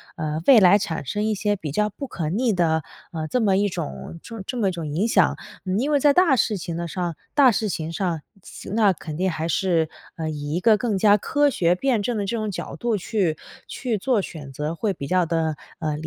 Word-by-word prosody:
呃， 155 -1 -3
未 260 -4 +9
来 190 0 +7
产 170 -7 -3
生 210 +9 -1
一 220 - +1
些 205 0 0
比 160 -7 -6
较 210 +8 +1
不 275 +7 -7
可 165 -10 -3
逆 225 +6 +1
的， 160 -3 +1 0.3
呃， 160 -2 -4
这 250 +9 0
么 195 -3 +3
一 205 +1 +2
种 65 - -6 0.3
这 250 - -4
么 215 -4 +1
一 - - -1
种 170 -3 -5
影 170 +10 0
响。 - - +3 0.3
嗯， 190 +2 0
因 270 +5 0
为 290 - +4
在 290 +1 +5
大 340 -4 +5
事 220 -3 +1
情 170 -2 -5
的 170 0 -3
上 175 -1 -3 0.2
大 275 -4 +6
事 220 0 -1
情 160 -2 -3
上， 170 -2 -2 0.2
期 - - -10
那 210 -1 +4
肯 155 -3 -7
定 185 +2 +1
还 160 0 -3
是， 170 -3 +1 0.3
呃， 160 -1 -3
以 145 -1 -4
一 - - +1
个 220 +4 +5
更 215 -3 -1
加 205 +1 +5
科 290 +7 +2
学 175 -6 +2
辩 245 +2 +1
证 235 +2 -1
的 205 - -1
这 235 - -2
种 215 -1 -2
角 190 - -5
度 235 -3 -1
去 180 -5 -1 0.3
去 245 -4 -2
做 225 +2 +1
选 145 -4 -8
择， 150 +4 -3
会 205 +4 -1
比 140 - -6
较 185 +2 +3
地， 160 -1 0 0.2
呃， 155 -2 -1
理 - - -1
185 Hz, 260 characters per minute, -23 LUFS, 160-220 Hz, 0.3 s, 未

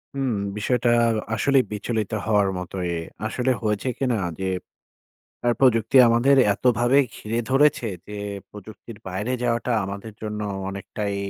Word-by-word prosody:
হুম, 135 -4 0 0.2
বিষয়টা 120 +2 +1 0.5
আসলেই 135 +3 +3
বিচলিত 110 0 -2
হওয়ার 105 -3 +3
মতোই। 90 0 -4 0.4
আসলে 130 +3 0
হয়েছে 105 +3 -1
কিনা 125 -4 0 0.2
যে 95 - -2 1.0
আ - - +4
প্রযুক্তি 115 -1 +3
আমাদের 125 +4 +4 0.2
এতভাবে 125 +3 +3 0.2
ঘিরে 115 +2 -3
ধরেছে, 135 -3 +3 0.2
যে 105 - -6 0.3
প্রযুক্তির 105 +2 -11
বাইরে 105 +7 -3
যাওয়াটা 120 0 0
আমাদের 100 +3 -7
জন্য 105 0 -4 0.3
অনেকটাই 100 +1 -4
115 Hz, 120 wpm, -23 LUFS, 105-125 Hz, 1.0 s, আ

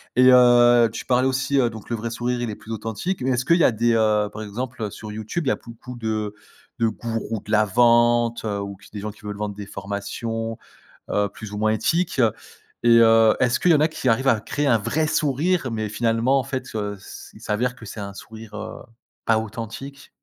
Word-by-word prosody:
Et 130 0 +7
heu, 120 -1 +6
tu - - -7
parlais 125 +1 +2
aussi 135 +1 +1
heu 120 -3 +3
Donc 110 -2 -11
le - - +1
vrai 115 +1 -4
sourire 120 +1 -2
il 120 - -2
est 105 - -5
plus 110 - -12
authentique 115 - -3
mais 130 +1 0
est-ce 125 0 0
qu'il 170 +3 +4
y 170 - +3
a - - +5
des, 115 +1 +1
heu 105 -2 +2
par 110 - -7
exemple, 115 +1 -5
sur 105 -1 -8
YouTube, 110 +10 -4
il 135 - +2
y - - +3
a - - +1
beaucoup 120 +2 -11
de 110 -2 -2 0.5
de 115 - +3
gourous 115 -1 -4
de 105 - -9
la 105 -1 +4
vente 120 +2 +3
ou 100 -2 -3
qui 105 - -18
des 105 - -6
gens 105 - -4
qui 105 - -20
veulent 105 -1 -4
vendre 105 -1 -4
des 105 - -7
formations, 110 +3 -5 0.5
heu, 105 0 +1
plus 105 0 -10
ou 105 - -5
moins 110 +1 +1
éthiques 165 - 0 0.6
et 120 -1 +6
heu, 115 -1 +6
est-ce 125 0 +2
qu'il 175 - +4
y - - +6
en 150 - +3
a 155 - +4
qui 155 - -3
arrivent 130 +4 +2
à 115 -4 +3
créer 145 +6 -2
un 115 -4 +4
vrai 150 +9 0
sourire 150 +1 0
mais 110 -1 -3
finalement 115 +4 +1
en 130 - -1
fait, 130 +1 -4
heu, 105 -1 -3
c' - - -11
il - - -15
s'avère 125 +4 -1
que - - -12
c'est 110 0 -8
un 100 -1 -6
sourire 110 0 -11
heu, 110 +1 -7 0.5
pas 115 -1 +4
authentique? 115 +5 -7
115 Hz, 230 wpm, -23 LUFS, 110-125 Hz, 0.6 s, Et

